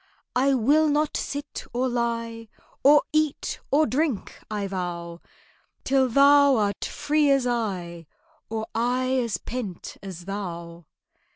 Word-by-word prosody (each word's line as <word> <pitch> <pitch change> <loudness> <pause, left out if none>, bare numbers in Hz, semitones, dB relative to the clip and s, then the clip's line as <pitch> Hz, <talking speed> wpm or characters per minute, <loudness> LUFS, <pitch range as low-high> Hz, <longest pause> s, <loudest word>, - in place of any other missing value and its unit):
"I 270 +2 +3
will 290 +6 +4
not 300 0 +1
sit 285 +1 -4
or 250 +2 +1
lie, 230 -2 -2 0.3
Or 290 +2 +7
eat 310 -2 0
or 300 +3 +4
drink, 285 -5 -2
I 210 -2 -2
vow, 175 -3 -5 0.6
Till 265 -1 +2
thou 280 +2 +6
art 205 -3 0
free 300 0 +1
as 275 -2 +3
I, 185 -9 -3 0.4
Or 220 0 -3
I 250 +2 0
as 235 -4 0
pent 220 -8 -6
as 180 -3 -8
thou." 170 -4 -6
240 Hz, 125 wpm, -25 LUFS, 195-275 Hz, 0.6 s, Or